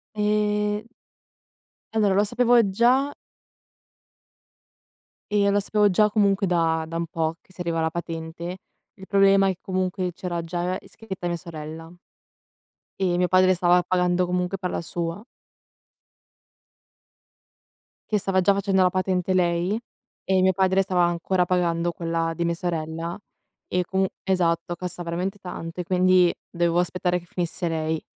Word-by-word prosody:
E 210 Hz, 0 st, 0 dB, 1.1 s
allora 210 Hz, -3 st, +3 dB
lo 200 Hz, +2 st, +4 dB
sapevo 240 Hz, +1 st, +3 dB
già 255 Hz, +8 st, +2 dB, 2.2 s
e 205 Hz, -1 st, +3 dB
lo 200 Hz, +1 st, +3 dB
sapevo 210 Hz, +1 st, +2 dB
già 210 Hz, +3 st, +4 dB
comunque 200 Hz, -2 st, +2 dB
da 165 Hz, -3 st, +1 dB
da 165 Hz, +1 st, -4 dB
un 170 Hz, 0 st, -2 dB
po' 160 Hz, 0 st, -1 dB
che -, -, -35 dB
si 185 Hz, -, -20 dB
serviva 170 Hz, -3 st, -2 dB
la 160 Hz, -, +1 dB
patente. 165 Hz, +1 st, -5 dB, 0.4 s
Il 190 Hz, -2 st, -13 dB
problema 195 Hz, -1 st, +5 dB
è 190 Hz, -, +1 dB
che -, -, -48 dB
comunque 185 Hz, -1 st, -2 dB
c'era 175 Hz, 0 st, -4 dB
già 175 Hz, +2 st, -2 dB
iscritta 190 Hz, -5 st, -7 dB
mia 175 Hz, -, -1 dB
sorella 165 Hz, -1 st, -8 dB, 1.1 s
e 180 Hz, -2 st, +1 dB
mio 180 Hz, 0 st, +2 dB
padre 185 Hz, +1 st, +5 dB
stava 180 Hz, 0 st, +3 dB
pagando 180 Hz, 0 st, +1 dB
comunque 180 Hz, +1 st, -1 dB
per 180 Hz, -1 st, -3 dB
la -, -, -3 dB
sua. 170 Hz, +4 st, -4 dB, 2.8 s
Che 210 Hz, -, +2 dB
stava 190 Hz, -1 st, +1 dB
già 185 Hz, +2 st, +4 dB
facendo 195 Hz, -1 st, +2 dB
la 180 Hz, -, +3 dB
patente 185 Hz, 0 st, 0 dB
lei, 180 Hz, +3 st, +1 dB, 0.5 s
e 190 Hz, 0 st, +2 dB
mio 190 Hz, 0 st, +4 dB
padre 190 Hz, 0 st, +2 dB
stava 180 Hz, -2 st, +1 dB
ancora 175 Hz, +2 st, 0 dB
pagando 175 Hz, -1 st, +1 dB
quella 165 Hz, -1 st, -2 dB
di 170 Hz, -, -1 dB
mia 170 Hz, -, +1 dB
sorella, 165 Hz, 0 st, -4 dB, 0.5 s
e 180 Hz, 0 st, 0 dB
comun 190 Hz, +2 st, 0 dB, 0.2 s
Esatto, 175 Hz, -2 st, 0 dB
costa 180 Hz, 0 st, -5 dB
veramente 180 Hz, +4 st, -3 dB
tanto 180 Hz, -2 st, -7 dB
e -, -, 0 dB
quindi 185 Hz, 0 st, +4 dB
dovevo 170 Hz, 0 st, 0 dB
aspettare 180 Hz, 0 st, 0 dB
che 175 Hz, -, -14 dB
finisse 175 Hz, 0 st, -3 dB
lei. 160 Hz, -1 st, -2 dB
180 Hz, 145 wpm, -24 LUFS, 170-195 Hz, 2.8 s, problema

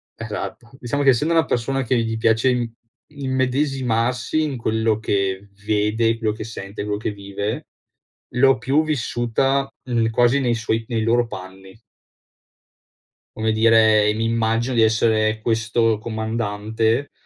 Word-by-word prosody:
esatto, 120 Hz, -, -6 dB
diciamo 135 Hz, +4 st, -2 dB
che 140 Hz, -, +4 dB
essendo 150 Hz, +6 st, +2 dB
una 165 Hz, -1 st, +3 dB
persona 135 Hz, +3 st, -1 dB
che 125 Hz, 0 st, 0 dB
gli 115 Hz, -1 st, -1 dB
piace 115 Hz, +3 st, +2 dB
im 120 Hz, -2 st, -1 dB, 0.4 s
immedesimarsi 130 Hz, -1 st, 0 dB
in 145 Hz, -3 st, -2 dB
quello 110 Hz, -1 st, 0 dB
che 100 Hz, -2 st, -1 dB, 0.2 s
vede, 110 Hz, +2 st, +1 dB
quello 110 Hz, -2 st, 0 dB
che 110 Hz, -, -6 dB
sente, 100 Hz, -2 st, -7 dB
quello 105 Hz, 0 st, -2 dB
che 110 Hz, -, -2 dB
vive, 100 Hz, +1 st, -5 dB, 0.7 s
l'ho 135 Hz, +1 st, +4 dB
più 135 Hz, +8 st, +1 dB
vissuta, 135 Hz, -1 st, 0 dB
mhmm, 115 Hz, -3 st, 0 dB
quasi 120 Hz, +4 st, +3 dB
nei 120 Hz, -3 st, +1 dB
suoi 115 Hz, 0 st, -1 dB
nei 115 Hz, -2 st, -1 dB
loro 120 Hz, +1 st, +2 dB
panni. 95 Hz, +1 st, -10 dB, 1.6 s
Come 110 Hz, 0 st, 0 dB
dire 110 Hz, -1 st, +4 dB
mi 110 Hz, +1 st, -1 dB
immagino 115 Hz, +2 st, 0 dB
di 115 Hz, -, +4 dB
essere 110 Hz, -1 st, +2 dB
questo 115 Hz, -1 st, +1 dB
comandante, 110 Hz, +2 st, -2 dB
115 Hz, 135 wpm, -21 LUFS, 110-125 Hz, 1.6 s, che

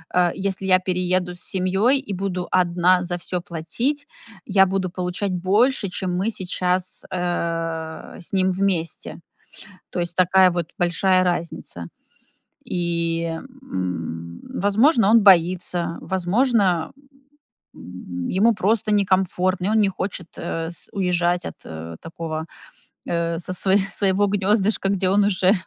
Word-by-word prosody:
э, 180 Hz, -1 st, +4 dB
если 195 Hz, 0 st, -3 dB
я 185 Hz, 0 st, +5 dB
перееду 180 Hz, -1 st, -1 dB
с -, -, -10 dB
семьёй 195 Hz, +8 st, +1 dB
и 235 Hz, -8 st, -6 dB
буду 185 Hz, -1 st, -3 dB
одна 180 Hz, 0 st, +3 dB
за 175 Hz, 0 st, -3 dB
всё 180 Hz, +1 st, -3 dB
платить, 230 Hz, -, -2 dB, 0.4 s
я 195 Hz, -1 st, +5 dB
буду 190 Hz, -1 st, -1 dB
получать 180 Hz, +2 st, -3 dB
больше, 200 Hz, +5 st, +2 dB
чем 180 Hz, 0 st, -3 dB
мы 210 Hz, +5 st, 0 dB
сейчас, 180 Hz, -1 st, -2 dB
э, 165 Hz, -2 st, -3 dB
с 175 Hz, -, -6 dB
ним 190 Hz, -1 st, +2 dB
вместе. 180 Hz, -4 st, -1 dB, 0.7 s
То 175 Hz, -, -3 dB
есть 175 Hz, 0 st, -2 dB
такая 185 Hz, 0 st, +5 dB
вот 175 Hz, -2 st, -2 dB
большая 185 Hz, +1 st, +3 dB
разница. 170 Hz, -, -3 dB, 0.8 s
И, 170 Hz, -1 st, -1 dB, 0.4 s
м, 85 Hz, -, -5 dB
возможно, 215 Hz, -, +3 dB
он 230 Hz, 0 st, +7 dB
боится, 175 Hz, -2 st, +3 dB
возможно, 190 Hz, -2 st, +1 dB, 0.8 s
м, 90 Hz, -1 st, -7 dB
ему 220 Hz, +5 st, +3 dB
просто 215 Hz, +1 st, +1 dB
некомфортно, 185 Hz, -2 st, +1 dB
и -, -, +1 dB
он 220 Hz, 0 st, +3 dB
не 200 Hz, -, +4 dB
хочет, 185 Hz, -2 st, -4 dB
э, 165 Hz, 0 st, -3 dB
с 170 Hz, -, -10 dB
уезжать 180 Hz, -2 st, +1 dB
от, -, -, -6 dB
э, 80 Hz, +1 st, -7 dB
такого, 165 Hz, -1 st, -5 dB, 0.6 s
э, 170 Hz, -1 st, -1 dB
со 185 Hz, -, -3 dB
сво 190 Hz, +1 st, +3 dB
своего 195 Hz, 0 st, +1 dB
гнёздышка, 200 Hz, 0 st, +1 dB
где 190 Hz, -1 st, +1 dB
он 200 Hz, +1 st, +4 dB
уже 190 Hz, -1 st, +3 dB
185 Hz, 135 wpm, -22 LUFS, 170-195 Hz, 0.8 s, он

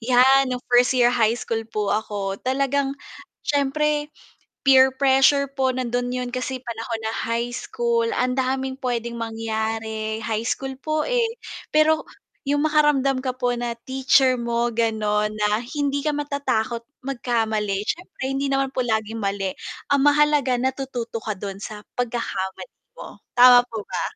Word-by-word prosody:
'Yan 255 Hz, +3 st, +5 dB
nung 250 Hz, -1 st, -4 dB
1st 245 Hz, +1 st, +5 dB
year 245 Hz, -1 st, +4 dB
high 230 Hz, 0 st, +2 dB
school 225 Hz, -2 st, -2 dB
po, 210 Hz, -2 st, -1 dB
ako 200 Hz, -2 st, -3 dB
talagang 275 Hz, +1 st, 0 dB, 0.5 s
syempre 295 Hz, +1 st, 0 dB, 0.6 s
peer 265 Hz, -1 st, +7 dB
pressure 270 Hz, +1 st, +4 dB
po 260 Hz, -2 st, 0 dB
nandun 245 Hz, -1 st, -1 dB
yun 250 Hz, 0 st, -3 dB
kasi 255 Hz, +1 st, -3 dB
panahon 230 Hz, -1 st, -4 dB
na 220 Hz, -, -1 dB, 0.2 s
high 235 Hz, +1 st, -1 dB
school, 465 Hz, -, -1 dB
ang 250 Hz, 0 st, +1 dB
daming 265 Hz, +1 st, -2 dB
pwedeng 235 Hz, -2 st, -3 dB
mangyari 220 Hz, -1 st, -3 dB
high 220 Hz, -1 st, -1 dB
school 270 Hz, +2 st, -2 dB
po 310 Hz, +1 st, -1 dB
eh, 475 Hz, -2 st, 0 dB, 0.3 s
pero 310 Hz, +1 st, +3 dB, 0.5 s
yung 290 Hz, +1 st, +2 dB
makaramdam 295 Hz, -4 st, +3 dB
ka 255 Hz, -1 st, -3 dB
po 245 Hz, -1 st, 0 dB
na 240 Hz, -1 st, -3 dB
teacher 260 Hz, -1 st, +3 dB
mo 235 Hz, 0 st, 0 dB
ganon, 215 Hz, -2 st, 0 dB
na 210 Hz, +1 st, +1 dB, 0.2 s
hindi 285 Hz, -1 st, 0 dB
ka 295 Hz, 0 st, -1 dB
matatakot 265 Hz, -6 st, -1 dB, 0.2 s
magkamali 220 Hz, -6 st, -1 dB
syempre 355 Hz, +2 st, -5 dB
hindi 275 Hz, +1 st, -1 dB
naman 270 Hz, -1 st, 0 dB
po -, -, 0 dB
laging 220 Hz, -1 st, -2 dB
mali, 195 Hz, -1 st, -1 dB, 0.4 s
ang 280 Hz, -, +4 dB
mahalaga 290 Hz, -3 st, +3 dB
natututo 250 Hz, -3 st, -3 dB
ka 215 Hz, -2 st, -3 dB
dun 195 Hz, -1 st, -6 dB
sa 210 Hz, 0 st, -7 dB
pagkakamali 230 Hz, -, -3 dB, 0.3 s
mo, -, -, -10 dB, 0.2 s
tama 245 Hz, 0 st, +9 dB
po 220 Hz, -2 st, -5 dB
ba? -, -, -3 dB
250 Hz, 145 wpm, -23 LUFS, 225-275 Hz, 0.6 s, tama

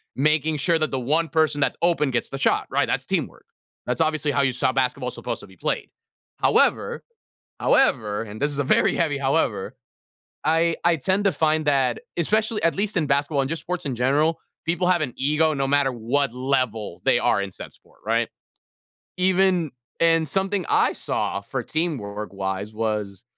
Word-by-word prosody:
making 155 Hz, +2 st, +1 dB
sure 165 Hz, +4 st, +2 dB
that 155 Hz, -, -1 dB
the 135 Hz, -, -1 dB
1 155 Hz, +6 st, 0 dB
person 155 Hz, -2 st, +1 dB
that's -, -, +1 dB
open 170 Hz, -5 st, +2 dB
gets 125 Hz, -, -1 dB
the 135 Hz, -, -5 dB
shot, 135 Hz, -, +2 dB
right? -, -, +1 dB
That's -, -, -1 dB
teamwork. -, -, -3 dB, 0.4 s
That's 125 Hz, +6 st, -1 dB
obviously 155 Hz, -2 st, +1 dB
how 140 Hz, -, +1 dB
you 135 Hz, -1 st, +2 dB
saw 125 Hz, +1 st, +1 dB
basketball 130 Hz, -1 st, 0 dB
supposed -, -, -4 dB
to -, -, -12 dB
be -, -, -17 dB
played. -, -, -2 dB, 0.5 s
However, -, -, +2 dB, 0.6 s
however, 110 Hz, -, +2 dB
and 110 Hz, -1 st, -9 dB
this 145 Hz, -, +1 dB
is 145 Hz, -, -3 dB
a 145 Hz, -, +1 dB
very -, -, +3 dB
heavy 155 Hz, -4 st, 0 dB
however, 135 Hz, -8 st, 0 dB, 0.7 s
I 165 Hz, +2 st, +2 dB
I 170 Hz, 0 st, +4 dB
tend 190 Hz, +7 st, 0 dB
to 195 Hz, -, +4 dB
find 155 Hz, -2 st, +1 dB
that 135 Hz, -4 st, +2 dB, 0.2 s
especially 215 Hz, +5 st, 0 dB
at 165 Hz, -, +2 dB
least 205 Hz, +1 st, -1 dB
in 155 Hz, -3 st, +1 dB
basketball 140 Hz, +1 st, +1 dB
and 135 Hz, -, -2 dB
just 165 Hz, +1 st, -3 dB
sports 180 Hz, -2 st, -4 dB
in 135 Hz, -3 st, -2 dB
general, 145 Hz, +7 st, +2 dB, 0.3 s
people 175 Hz, +2 st, 0 dB
have 180 Hz, -2 st, +3 dB
an 135 Hz, -6 st, -2 dB
ego 150 Hz, +3 st, +2 dB
no 135 Hz, -1 st, -1 dB
matter 140 Hz, -1 st, +2 dB
what 125 Hz, +3 st, -1 dB
level 125 Hz, -7 st, -1 dB
they -, -, +3 dB
are -, -, +2 dB
in 100 Hz, -1 st, -5 dB
said -, -, -10 dB
sport, -, -, -25 dB
right? -, -, +1 dB, 0.9 s
Even 185 Hz, -3 st, +2 dB, 0.3 s
and 165 Hz, -1 st, +4 dB
something 195 Hz, +2 st, -1 dB
I -, -, +3 dB
saw -, -, -2 dB
for -, -, -5 dB
teamwork 105 Hz, -, -3 dB
wise 95 Hz, +2 st, -4 dB
was, 105 Hz, -3 st, -3 dB
145 Hz, 185 wpm, -23 LUFS, 125-165 Hz, 0.9 s, I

